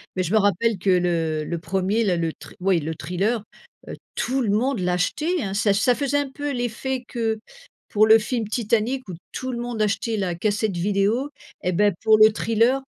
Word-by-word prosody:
Mais 185 - 0
je 180 +5 -3
me 220 - +5
rappelle 205 +2 +2
que 190 +2 -1
le 165 -4 +1
le 170 +2 -3
1er, 190 +6 0
là, 185 -5 +1
le 165 -1 -1
thri - - -14
ouais 185 -1 +2
le 160 +1 -4
thriller, 200 +7 -1 0.4
heu, - - -6 0.2
tout 265 +2 0
le 225 - 0
monde 230 +4 +1
l'achetait 185 - 0
hein, 195 -4 -3
ça 205 0 +2
ça 230 +5 +3
faisait 285 +1 0
un 285 -1 -1
peu 290 +1 -4
l'effet 245 +1 -3
que 225 -3 -2 0.5
pour 215 +1 +3
le 220 +1 +8
film 230 0 -2
Titanic 230 +3 -1
où 185 - -6 0.2
tout 260 0 -4
le - - -3
monde 240 -2 -3
achetait 220 +1 0
la 180 -3 -1
cassette 210 +1 -1
vidéo 205 +8 0 0.3
et 180 - +1
ben, 205 +3 +3
pour 220 0 +6
le 215 0 +7
thriller, 230 +5 +2
215 Hz, 205 wpm, -23 LUFS, 185-240 Hz, 0.5 s, le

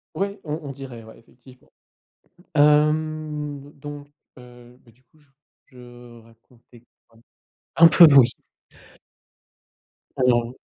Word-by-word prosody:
Oui, 200 +1 -4
on 155 0 -6
on 140 - -8
dirait, 130 -4 -11
ouais, 110 - -16
effectivement. 125 +2 -22 0.8
Hem, 150 -1 -1
donc, 145 0 -11 0.3
heu, 125 0 -17
bah 115 - -22
du 120 +3 -31
coup 155 - -31
je 145 - -31 0.4
je 120 -2 -16
racontais 115 +1 -24 0.2
quoi? 115 0 -26 0.6
Un 165 0 +7
peu 165 +2 +7
oui. 130 -3 +6 1.9
Alors 120 -1 0
135 Hz, 110 wpm, -21 LUFS, 120-150 Hz, 1.9 s, Un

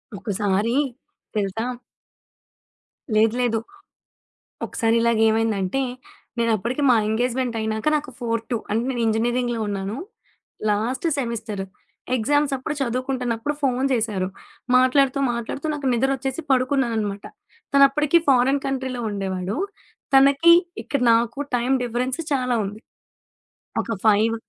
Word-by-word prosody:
ఒక్కసారి, 205 +1 0 0.6
తెలుసా? 210 +3 -1 1.5
లేదు, 220 +1 +4
లేదు. 230 -2 +1 1.1
ఒకసారి 225 -1 0
ఇలాగేమైందంటే, 225 -1 +2 0.6
నేనప్పటికి 230 +4 0
మా 245 - +6
ఎంగేజ్మెంటయినాక 230 0 -1
నాకు 295 -2 -4
4-2 230 0 -2
అంటే 220 +2 +1
నేను 245 -2 -2
ఇంజినీరింగ్‌లో 240 +2 0
ఉన్నాను. 200 +1 -3 0.7
Last 225 +9 -1
semester. 225 -6 -3 0.5
ఎగ్జామ్సప్పుడు, 290 +3 0
చదువుకుంటున్నప్పుడు 255 +1 -2
ఫోను 260 -1 +1
చేశారు. 210 -5 -1 0.5
మాట్లాడుతూ, 260 +2 +4
మాట్లాడుతూ 235 +5 -4
నాకు 285 -2 -2
నిద్రొచ్చేసి 270 +4 -1
పడుకున్నాననమాట. 235 -6 0 0.5
తనప్పటికి 280 +3 +5
ఫారెన్ 265 +1 +4
కంట్రీలో 260 -2 -3
ఉండేవాడు. 190 0 -3 0.6
తనకి 280 +5 +6 0.3
ఇక్కడ 280 - -1
నాకు 230 +3 +1 0.2
టైమ్ 250 +3 +1
డిఫరెన్స్ 250 +4 -2
చాలా 250 -2 +1
ఉంది. 205 +2 -8 1.0
ఒక - - -4
5 215 +2 +4
235 Hz, 95 wpm, -23 LUFS, 220-265 Hz, 1.5 s, మా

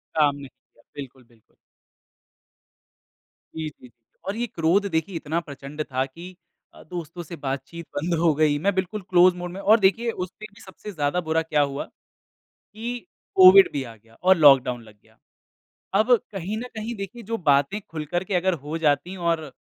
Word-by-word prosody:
काम 145 -2 +3
नहीं 140 -1 -9
किया। 115 - -31
बिल्कुल, 135 -2 -9
बिल्कुल। 115 -2 -29 2.0
जी, 160 -1 -3
जी। 130 -4 -17 0.4
और 195 - -2
ये 240 +1 -2
क्रोध 190 0 +1
देखिए 165 +4 -1
इतना 165 +1 -2
प्रचंड 145 -1 -7
था 130 +1 0
कि 170 +7 -11 0.4
अ, - - -15
दोस्तों 175 0 -7
से 170 +1 -8
बातचीत 140 +4 -5
बंद 165 +4 -1
हो 165 -1 +4
गई। 150 -1 +3
मैं 200 +6 +1
बिल्कुल 190 +3 -2
क्लोज 180 0 +6
मोड 180 0 -6
में 185 - -7
और 215 +3 +5
देखिए 215 +4 +2
उसमें 185 +2 -7
भी - - -17
सबसे 195 +2 -10
ज़्यादा 155 0 -1
बुरा 160 -1 0
क्या 160 -2 +1
हुआ? 140 0 -2 0.7
कि 235 +3 -7 0.4
कोविड 380 0 +9
भी 140 - -2
आ 115 -3 -10
गया 115 +1 -24
और 185 0 +6
लॉकडाउन 135 -5 +5
लग 110 -2 -17
गया। 110 0 -27 0.8
अब 215 +5 +3 0.2
कहीं 195 +2 -4
न - - -4
कहीं 220 +2 -4
देखिए 200 +4 -7
जो 230 +2 -3
बातें 145 +4 +2
खुल 155 -2 -5
कर 175 +4 -2
के 190 - -4
अगर 185 +1 +2
हो 160 +2 -3
जाती 160 +4 +1
और 170 -2 0
अ, 145 - -10
165 Hz, 185 wpm, -24 LUFS, 145-190 Hz, 2.0 s, कोविड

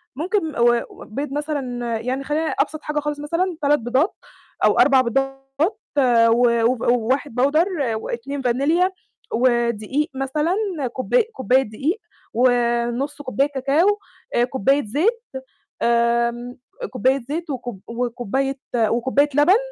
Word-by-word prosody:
ممكن 330 +1 -1
م - - -12
و 240 0 +4
وبيض 275 +6 -6
مثلًا 255 -6 -3
يعني 260 +4 -3
خلينا 310 +3 -1
أبسط 310 -1 -1
حاجة 300 0 -2
خالص 295 0 -3
مثلًا 335 +3 -1
3 290 +1 +3
بيضات 255 - 0 0.5
أو - - +4
4 270 -2 +6
بيضات 270 +3 -1 0.7
و 235 0 +4
وف 245 -1 +1
1 245 +2 0
powder 310 +7 +3 0.3
و2 270 +5 -4
فانيليا، 295 +10 +2 0.4
ودقيق 240 +3 +1
مثلًا، 300 +7 0 0.4
كوباي 460 - +2
كوباية 265 - +1
دقيق، 280 - -2 0.3
ونُصّ 245 +3 +1
كوباية 275 +1 0
كاكاو، 295 +10 +2 0.4
آآ، 240 - +4
كوباية 265 +2 +1
زيت، 390 - 0 0.6
آمم، 235 +1 +1 0.3
كوباية 260 +1 +1
زيت 320 +2 -4
وكوب 245 -6 -5
وكوباية 245 +3 -2 0.2
وكوباية 240 +6 +2
لَبَن، 310 +8 +5
265 Hz, 120 wpm, -21 LUFS, 240-295 Hz, 0.7 s, 4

